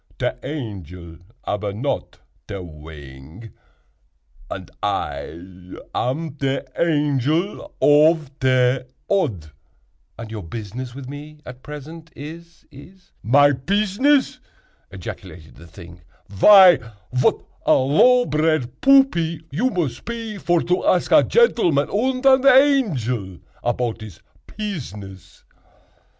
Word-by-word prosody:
Te - - -1
angel 90 - -7 0.3
ab 105 - -2
not 130 +7 -4 0.3
te 100 - -6
wing, 75 +3 -12 1.0
and - - -8
I 90 +2 -5 0.2
am 150 +3 -3
te 135 -1 -1
Angel 155 - 0
ov 150 0 +4
te 130 0 +2 0.3
Odd." 110 - -1 0.7
"And 115 -1 -9
your 110 -2 -6
business 115 +7 -7
with 135 -2 -9
me 145 +2 -10
at 125 0 -11
present 155 +3 -10
is—is—" 170 +3 -13
"My 145 +6 +4
pizzness!" 210 - +1 0.5
ejaculated 90 -3 -10
the 85 +3 -15
thing, 85 +1 -14 0.3
"vy 180 - +7 0.4
vat 125 - +3 0.3
a - - +6
low 245 - +4
bred 155 - -1
buppy 175 - +3
you 230 - 0
mos 170 - -2
pe 230 -3 -6
vor 175 -3 +1
to 180 +1 0
ask 180 - +1
a - - +7
gentleman 175 - +2
und 255 +5 -1
an 270 0 +5
angel 160 - +2 0.3
apout 120 -1 -2
his 105 -6 -11 0.3
pizziness!" 105 - -8
145 Hz, 110 wpm, -21 LUFS, 110-180 Hz, 1.0 s, vy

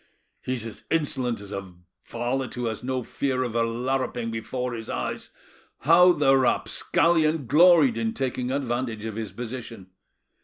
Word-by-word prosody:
"He's 125 -3 -3
as 115 - -9
insolent 135 -7 0
as 100 0 -10
a 95 -3 -6 0.3
varlet 120 +2 -3
who 125 -1 -3
has 110 -1 -3
no 130 0 -2
fear 130 +1 -1
of 120 -3 -4
a 115 - +1
larruping 120 0 -1
before 125 +3 -3
his 115 -1 -7
eyes: - - -4 0.5
how 175 +5 +6
the 145 -5 +4
rapscallion 155 +4 +2
gloried 150 -2 +5
in 110 -1 -1
taking 130 -2 -2
advantage 120 -4 -2
of 110 -2 -5
his 110 -2 -5
position! 115 -5 -8
125 Hz, 150 wpm, -25 LUFS, 115-135 Hz, 0.5 s, how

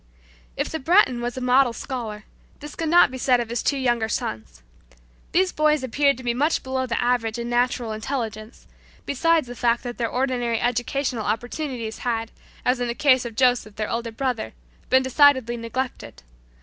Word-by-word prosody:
If - - -1
the 320 - -4
Breton 270 -6 +3
was 240 +1 -4
a - - -4
model 250 0 +3
scholar, 225 -5 -6 0.4
this 295 0 -9
could 325 -1 -3
not 345 -5 +6
be 260 - -6
said 250 -1 +3
of 235 -2 -3
his 235 0 -2
two 280 - 0
younger 240 -4 0
sons. 110 - -4 0.7
These 370 +1 +2
boys 305 -2 +2
appeared 280 +2 +2
to 260 - -10
be 240 -1 0
much 295 +6 +1
below 260 0 -2
the 230 - -1
average 240 -2 0
in 235 0 -4
natural 245 -1 0
intelligence, 220 -1 -5 0.4
besides 325 +3 +2
the 245 - -8
fact 240 0 0
that 245 -1 -6
their 230 -1 0
ordinary 245 -3 -1
educational 245 0 -1
opportunities 235 +1 -3
had, 230 -2 -2 0.3
as 250 0 +2
in 245 - -1
the 235 - -3
case 260 -3 +3
of 230 -2 -6
Joseph, 245 -4 +2
their 215 -1 -3
older 230 0 -3
brother, 235 - -3 0.4
been 260 0 +4
decidedly 260 -3 +4
neglected. 240 +3 -5
245 Hz, 180 wpm, -23 LUFS, 230-265 Hz, 0.7 s, not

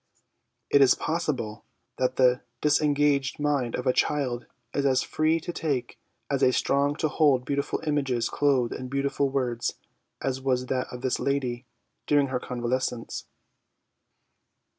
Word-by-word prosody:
It 140 - +6
is 135 - +6
possible 145 -10 -2 0.4
that 130 0 +1
the 125 -1 +4 0.2
disengaged 145 -1 +2
mind 145 -5 0
of 125 - -4
a 130 - +3
child 130 -5 0 0.3
is 140 - 0
as 130 -2 +3
free 155 +1 +1
to 175 +2 -6
take 140 -7 -2 0.3
and 140 -2 -1
as 125 - +4
strong 140 +1 +1
to 155 - 0
hold 145 -5 +3
beautiful 140 +1 -2
images 135 -6 0
clothed 135 -5 +1
in 130 - -6
beautiful 140 +1 0
words 125 -3 -1 0.4
as 135 -1 -2
was 130 -1 0
that 130 0 -1
of 125 - -7
this 130 - 0
lady 130 -3 -1 0.4
during 145 -2 +3
her 130 -1 -1
convalescence. 125 -1 -3
135 Hz, 140 wpm, -27 LUFS, 125-145 Hz, 0.4 s, It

